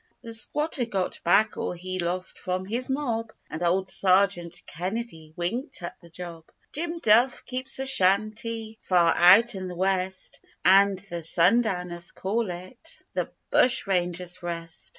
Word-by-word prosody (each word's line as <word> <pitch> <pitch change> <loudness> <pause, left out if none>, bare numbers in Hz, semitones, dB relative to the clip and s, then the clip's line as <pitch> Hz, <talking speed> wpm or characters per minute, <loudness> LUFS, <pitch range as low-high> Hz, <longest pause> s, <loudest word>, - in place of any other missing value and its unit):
The 230 - -6
squatter 285 +3 +2
got 195 -5 -3
back 205 +5 +3
all - - -2
he 185 +1 -5
lost 180 +1 -2
from 185 0 -3
his 240 +6 -3
mob, 235 -5 -2 0.2
And 155 - -5
old 185 +2 +1
Sergeant 185 -3 +2
Kennedy 180 -2 -5
winked 190 - -4
at 175 - -6
the 170 - -16
job; 165 -1 -9 0.3
Jim 335 +2 -3
Duff 240 -2 +3
keeps 255 +1 -3
a 265 - -3
shanty 220 +1 0
far 175 -3 +3
out 205 +7 +7
in 190 -2 -5
the 180 - -7
west, 190 0 -2 0.3
And 195 +1 +5
the 170 -1 -4
sundowners 180 0 +1
call 210 +2 -2
it 185 - -9
the - - -2 0.2
'Bushranger's 180 -6 +1
Rest. 170 -1 -6
190 Hz, 145 wpm, -26 LUFS, 175-230 Hz, 0.3 s, out